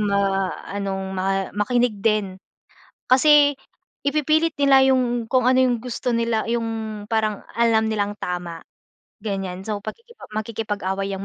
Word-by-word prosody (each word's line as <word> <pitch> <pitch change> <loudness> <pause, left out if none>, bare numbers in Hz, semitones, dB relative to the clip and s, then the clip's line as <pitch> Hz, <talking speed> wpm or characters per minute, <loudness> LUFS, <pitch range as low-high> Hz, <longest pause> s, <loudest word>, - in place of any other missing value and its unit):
ma 195 -2 +1 0.3
anong 195 -1 -2
ma 195 +1 0
makinig 230 0 +1
din. 210 -4 +1 0.7
Kasi 290 +2 +6 0.6
ipipilit 310 +2 +1
nila 275 -2 +5
'yong 245 -3 +1
kung 255 -1 +2
ano 260 0 +4
'yong 250 -3 +2
gusto 245 0 -2
nila 230 -1 0
'yong 225 -2 -3
parang 215 -2 -1
alam 225 -2 +3
nilang 205 -1 -1
tama, 175 -2 -5 0.6
ganyan. 195 -3 -4
So 210 -1 -2
pakiki 465 - -9 0.2
makikipag-away 205 -3 -3
'yang 195 0 -5
220 Hz, 130 wpm, -22 LUFS, 195-245 Hz, 0.7 s, Kasi